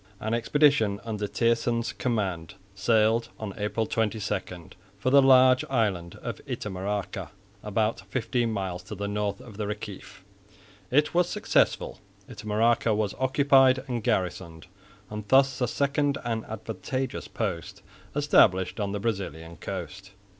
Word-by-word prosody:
An 110 +1 -2
expedition 115 -4 +3
under 105 -2 -3
Thijssen's 115 +1 0
command 95 -9 -2 0.2
sailed 110 +3 +2
on 105 -3 -5
April 105 +2 -1
22 110 0 -1 0.8
for 130 +6 0
the 140 0 +8
large 130 -1 +6
island 100 -9 0
of - - -5
Itamaraca 100 0 -4 0.3
about 105 +1 -1
fifteen 115 +1 0
miles 95 -4 -3
to 100 +4 -8
the 100 +1 -3
north 105 +1 -2
of 115 -6 -12
the 105 -1 -2
Reciff. 105 -3 -7 0.7
It 150 +4 +2
was 175 0 +3
successful. - - +1 0.3
Itamaraca 110 +1 +1
was 105 -2 -1
occupied 130 -1 +4
and 120 -4 -3
garrisoned, 85 -3 -2 0.5
and 105 -1 -6
thus 135 +2 +4
a 125 - +2
second 140 +2 0
and 115 -2 -2
advantageous 110 +4 -4
post 95 -7 -4 0.3
established 100 -11 +3
on 100 -1 -2
the 105 - -2
Brazilian 95 -6 -4
coast. 95 +4 -7
110 Hz, 130 wpm, -27 LUFS, 100-125 Hz, 0.8 s, the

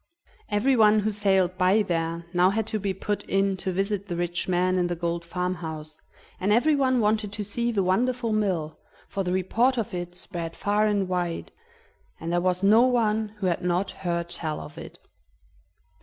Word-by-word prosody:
Everyone 215 -1 +4
who 215 +1 0
sailed 190 -3 +2
by 190 +4 +4
there 165 -2 -2
now 180 +1 +4
had 220 +2 -1
to 215 - +1
be 200 -1 -1
put 205 +2 -3
in 195 0 +1
to 190 0 -3
visit 200 +2 -2
the 175 - -3
rich 175 0 -2
man 185 0 +2
in 175 - +1
the 175 - -2
gold 170 0 -2
farmhouse, 165 -3 -4 0.4
and 195 +3 0
everyone 260 +1 +3
wanted 210 -1 +1
to 210 - -2
see 235 +4 -1
the 200 -4 +1
wonderful 230 +5 +1
mill, 185 -8 -1 0.3
for 195 - -3
the 180 - -2
report 230 +8 +2
of 230 -2 -2
it 175 0 -5
spread 170 -2 -5
far 210 +1 +1
and 200 -2 +1
wide, 175 -2 -2 0.7
and 165 - -4
there 175 - +2
was 180 +1 0
no 215 +4 +6
one 220 -4 +2
who 205 - -3
had 175 -2 0
not 180 +2 0
heard 170 -2 -3
tell 155 -3 -3
of 75 0 -10
it. - - -10
190 Hz, 185 wpm, -26 LUFS, 175-215 Hz, 0.7 s, no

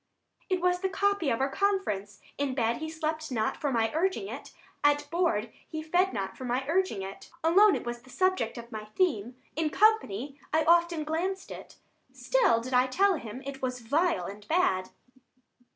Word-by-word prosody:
Adr. 375 - +3
It 365 - -5
was 360 0 +2
the 380 +1 -1
copy 400 -4 +1
of 230 - 0
our 270 +1 +1
conference: 210 - -1 0.2
In 280 -2 -1
bed, 235 -2 +1
he 315 0 -5
slept 315 -1 -3
not 220 -3 0
for 285 - -1
my 225 -2 +1
urging 380 +4 0
it; - - -8 0.3
At 290 0 +3
board, 285 -11 +1 0.2
he 315 0 -5
fed 355 +4 +2
not 195 -4 -4
for - - -9
my 250 +2 -1
urging 330 - 0
it; 195 +1 -9
Alone, 390 +5 +6
it - - -4
was 240 0 -4
the 255 - -19
subject 370 -9 0
of 235 0 -9
my 215 -1 -6
theme; 240 - 0 0.2
65 325 - 0
In 310 - +1
company 290 - +2
I 315 +1 +3
often 340 -1 +3
glanced 360 +5 -2
it; - - -10 0.4
Still - - +2
did 255 +2 -6
I 250 +1 +4
tell 390 +9 +3
him 235 +1 -8
it 275 -1 -6
was 250 -1 -2
vile 320 +9 +1
and 205 +1 -9
bad. 190 - +2
295 Hz, 195 wpm, -29 LUFS, 235-360 Hz, 0.4 s, Alone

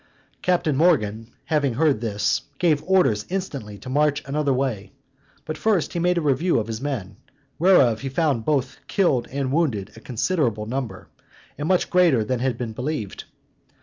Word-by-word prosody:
Captain 175 -5 +1
Morgan 115 -9 +2 0.2
having 145 -6 +1
heard 145 -4 +2
this, 105 -3 0 0.2
gave 160 -5 +2
orders 180 - +3
instantly 140 - -4
to 130 - -12
march 145 +2 +1
another 145 +1 0
way; 125 -6 -1 0.5
but 155 0 -5
first 210 -7 +1
he 170 - -1
made 180 +1 +2
a - - +2
review 155 +4 +2
of 110 - -2
his 110 +1 -5
men, 110 -9 -4 0.4
whereof 135 - +5
he 135 - -3
found 135 -4 0
both 130 -3 -1
killed 140 - +1
and 135 -1 -2
wounded 130 - 0
a - - -11
considerable 120 - -1
number, 115 -5 -5 0.5
and 150 - -4
much 185 0 +2
greater 170 -11 +4
than 125 +3 -2
had 125 -2 -1
been 120 -3 -4
believed. 125 -5 -4
135 Hz, 165 wpm, -23 LUFS, 115-160 Hz, 0.5 s, whereof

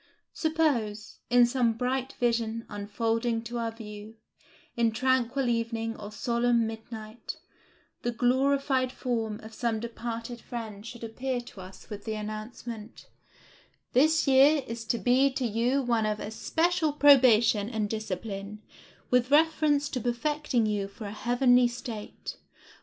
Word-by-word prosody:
Suppose, 280 -11 -1
in 245 0 +6
some 240 -2 +1
bright 255 +3 -2
vision 230 -1 -1
unfolding 225 +3 -1
to 235 +1 -4
our 230 -1 -1
view, 215 -1 -10 0.6
in 230 -1 +2
tranquil 260 +2 +1
evening 230 -1 -1
or 205 0 -8
solemn 235 +1 +1
midnight, 220 0 -7 0.6
the 240 - -1
glorified 260 +2 +2
form 225 -5 -2
of 220 +1 -10
some 230 -1 -1
departed 230 +1 -5
friend 220 -4 -7
should 235 0 -9
appear 250 +3 -3
to 225 -5 -12
us 185 +1 -12
with 205 -1 -7
the 220 -1 -2
announcement, 215 +1 -7 0.8
"This 310 +5 +4
year 275 +2 +6
is 230 0 -6
to 235 - 0
be 255 +4 +3
to 260 -1 -1
you 240 +5 +1
one 230 -3 +1
of 210 0 -1
especial 320 - 0
probation 240 -7 +5
and 220 -3 -1
discipline, 210 0 -5 0.5
with 250 0 +3
reference 300 -1 +3
to 255 - -3
perfecting 250 +1 0
you 205 -2 -1
for 200 +2 -10
a 200 - -5
heavenly 245 +2 +3
state. 240 -3 -7
235 Hz, 135 wpm, -28 LUFS, 220-255 Hz, 0.8 s, in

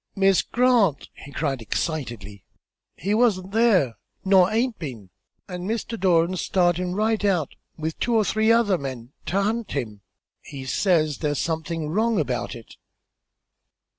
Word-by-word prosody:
"Miss 195 -1 +4
Grant," 240 - +2
he 140 - -12
cried, 140 -3 -2
excitedly, 115 - -4 0.5
"he 195 +6 -2
wa'n't 205 -5 +2
there, 200 - +3 0.3
nor 190 -1 +5
haint 230 +2 0
been; 115 - -8 0.4
an' 180 -1 -6
Mr. 230 +1 -3
Doran's 180 -1 +2
startin' 180 0 +1
right 215 +1 0
out, 180 -8 +1 0.2
with 160 0 -4
two 240 - 0
or 215 -2 +3
three 220 +2 +2
other 220 -6 +3
men, 130 -2 -7
to 185 +5 +1
hunt 220 +2 -1
him. 110 -7 -4 0.4
He 135 -3 -9
says 155 -1 +1
there's 145 -2 -1
somethin' 160 0 -2
wrong 220 +4 +1
about 125 -4 -2
it." 115 -2 -13
180 Hz, 140 wpm, -24 LUFS, 140-210 Hz, 0.5 s, nor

